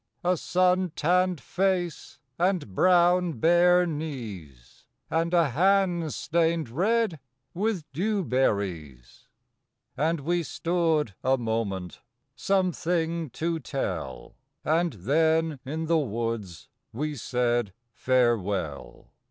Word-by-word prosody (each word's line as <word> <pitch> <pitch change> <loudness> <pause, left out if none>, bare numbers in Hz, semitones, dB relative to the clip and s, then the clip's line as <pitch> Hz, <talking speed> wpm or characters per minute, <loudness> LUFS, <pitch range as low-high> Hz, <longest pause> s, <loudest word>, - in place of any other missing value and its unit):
A 180 +1 +2
sun 180 0 +1
tanned 180 +1 +2
face 180 -2 -2 0.2
and 175 - 0
brown 175 - +4
bare 175 +6 +4
knees, 110 - -7 0.2
And 165 +1 0
a 170 -4 +3
hand 175 +1 +2
stained 165 -3 0
red 195 - +1 0.3
with 200 -2 -1
dewberries. 105 - -2 0.7
And 160 +1 0
we 175 +4 0
stood 165 - 0
a 130 +1 +3
moment 110 -6 -3 0.3
some 185 +7 +1
thing 165 -1 -2
to 165 +6 -2
tell, 85 - -5 0.3
And 165 +1 +1
then 160 - +1
in 155 +4 -3
the 165 0 +2
woods 115 - -4 0.2
we 150 +5 -3
said 120 -3 0 0.2
farewell. 105 - -1
160 Hz, 100 wpm, -26 LUFS, 120-175 Hz, 0.7 s, brown